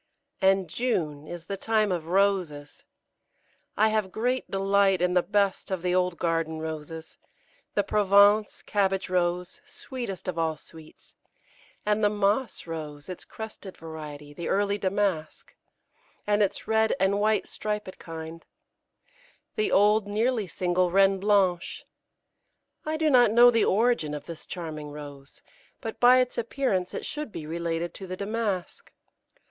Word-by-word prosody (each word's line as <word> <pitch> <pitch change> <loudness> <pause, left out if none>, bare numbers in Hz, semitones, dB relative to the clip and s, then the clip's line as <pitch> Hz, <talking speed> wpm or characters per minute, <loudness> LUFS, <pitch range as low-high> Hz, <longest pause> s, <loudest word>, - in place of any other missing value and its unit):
And 190 -1 +3
June 155 - -2
is 175 -1 -8
the 195 - -4
time 215 0 +1
of 170 -3 -2
Roses. 180 -6 0 0.9
I 220 +1 +4
have 215 -3 0
great 250 +5 -1
delight 195 -1 +2
in 180 +1 +1
the 180 - +4
best 200 0 0
of 185 -3 -3
the 180 0 +1
old 180 -1 +1
garden 165 -1 -1
Roses; 160 0 -7 0.6
the 205 - +3
Provence 205 +1 +4
(Cabbage 195 -2 0
Rose), 180 0 -1
sweetest 240 -9 -6
of 175 -2 -2
all 160 -1 0
sweets, 160 -1 -16 0.7
and 210 +1 +1
the 205 - +5
Moss 210 +4 0
Rose, 150 -3 -7
its 180 - -7
crested 215 -3 -9
variety; 150 -2 -9
the 170 +3 -5
early 205 +1 +1
Damask, 190 -5 -2 0.7
and 205 0 +2
its 200 - -1
red 220 0 +2
and 195 +2 +2
white 215 +1 +2
striped 210 -3 -4
kind; 165 0 -8 1.1
the 430 -2 0
old, 210 +1 +4
nearly 220 +1 0
single, 180 +1 0
Reine 195 +1 +4
Blanche. 195 -3 +1 1.0
I 310 0 -1
do 310 -1 +2
not 245 -3 +6
know 240 +3 +7
the 230 -2 +3
origin 210 -8 +2
of 145 - -7
this 165 -2 -9
charming 155 -4 -6
Rose, 145 -2 -11 0.4
but 225 - -6
by 250 +1 +7
its 250 -1 +1
appearance 230 -6 -1
it - - -4
should 300 -5 -5
be 155 - -7
related 170 +1 -3
to 190 - -9
the 185 0 -5
Damask. 200 -4 -3
190 Hz, 145 wpm, -27 LUFS, 165-210 Hz, 1.1 s, know